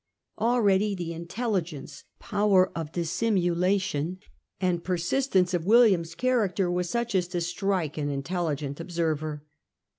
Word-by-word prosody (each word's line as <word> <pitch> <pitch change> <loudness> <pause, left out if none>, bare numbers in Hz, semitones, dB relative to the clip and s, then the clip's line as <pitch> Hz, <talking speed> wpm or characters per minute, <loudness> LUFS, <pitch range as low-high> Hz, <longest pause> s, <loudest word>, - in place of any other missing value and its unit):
Already 210 -4 +2
the 170 -2 -4
intelligence, 170 - -4
power 195 -3 +2
of 160 -2 -4
dissimulation, 180 -2 0 0.4
and 180 -3 0
per 185 -1 -1
sistence 185 -1 +1
of 175 0 -1
William's 200 -8 +4
character 205 -7 +1
were 180 0 0
such 235 +6 -2
as 180 -2 +1
to 180 0 -3
strike 175 -2 -1
an 145 -1 -1
intelligent 145 -1 -3
observer. 155 -3 -2
180 Hz, 120 wpm, -27 LUFS, 165-200 Hz, 0.4 s, William's